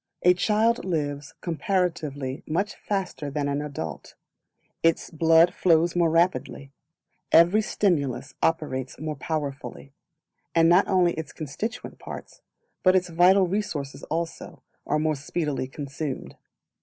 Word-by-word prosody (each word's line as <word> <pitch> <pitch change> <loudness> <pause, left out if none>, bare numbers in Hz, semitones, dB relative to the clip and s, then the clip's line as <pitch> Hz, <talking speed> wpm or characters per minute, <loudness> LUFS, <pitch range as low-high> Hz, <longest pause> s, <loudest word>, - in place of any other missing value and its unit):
A 180 - +7
Child 220 +5 +2
lives 145 -5 -3
comparatively 165 - -2
much 185 +7 -1
faster 190 -7 -3
than 145 0 -2
an 140 +1 -1
adult; 135 - -6 0.7
its 165 0 +1
blood 165 +2 +5
flows 170 -1 +3
more 170 -2 +3
rapidly; 165 -4 0 0.6
every 175 +6 +6
stimulus 145 - 0
operates 140 -5 -1
more 155 0 -3
powerfully; 140 -1 -5 0.6
and 165 0 +5
not 175 +4 +5
only 180 -3 +3
its 160 -2 -6
constituent 165 - -6
parts, - - -9 0.4
but 185 0 +5
its 180 -1 +2
vital 180 +3 +5
resources 150 -8 -3
also, 165 +1 -5 0.2
are 150 - +1
more 155 0 +1
speedily 145 -1 -3
consumed. 140 0 -5
160 Hz, 120 wpm, -25 LUFS, 145-180 Hz, 0.7 s, A